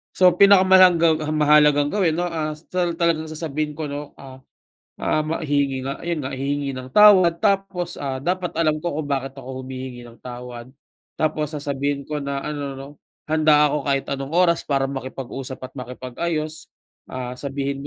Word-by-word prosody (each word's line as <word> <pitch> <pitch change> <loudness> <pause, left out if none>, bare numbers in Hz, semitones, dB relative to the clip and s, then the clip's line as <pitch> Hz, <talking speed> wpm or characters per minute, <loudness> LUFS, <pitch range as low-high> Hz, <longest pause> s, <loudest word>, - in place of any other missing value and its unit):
So, 185 -1 +6
pinakamalanggang 185 -4 +6
ang 155 0 -2
mahalagang 150 -1 +4
gawin 185 -6 +1
'no, 175 - -1
ah, 155 -2 -3
sa 155 - -19
ta 180 - 0
talagang 165 -2 0
sasabihin 155 -1 -4
ko 150 -2 -5
'no, 145 0 -7
ah, 130 -1 -12 0.6
ah, 155 - 0
ma 155 +2 -2
hihingi 140 -3 -1
nga 140 - -5
yun 170 -1 -2
nga, 135 - -4
hihingi 140 0 -2
ng 130 0 -8
tawad 185 -3 +6
tapos, 195 -4 0
ah, 135 -2 -4
dapat 180 +5 -2
alam 155 -2 +1
ko 170 -3 -2
kung 155 - -3
bakit 135 -1 -3
ako 130 0 -7
humihingi 130 -1 -7
ng 120 -1 -14
tawad. 125 -1 -8 0.5
Tapos 155 -1 -1
sasabihin 140 -1 -2
ko 150 +2 -4
na 140 -1 -4
ano 145 -2 -4
'no, 135 +1 -9 0.4
"Handa 155 -1 +4
ako 145 -1 -2
kahit 135 -1 0
anong 140 +2 -4
oras 170 -1 +3
para 135 -2 0
makipag-usap 130 -1 -7
at 130 - -8
makipag-ayos, 155 +6 -4 0.4
ah, 125 -1 -6
sabihin 140 0 -4
145 Hz, 170 wpm, -22 LUFS, 135-160 Hz, 0.6 s, So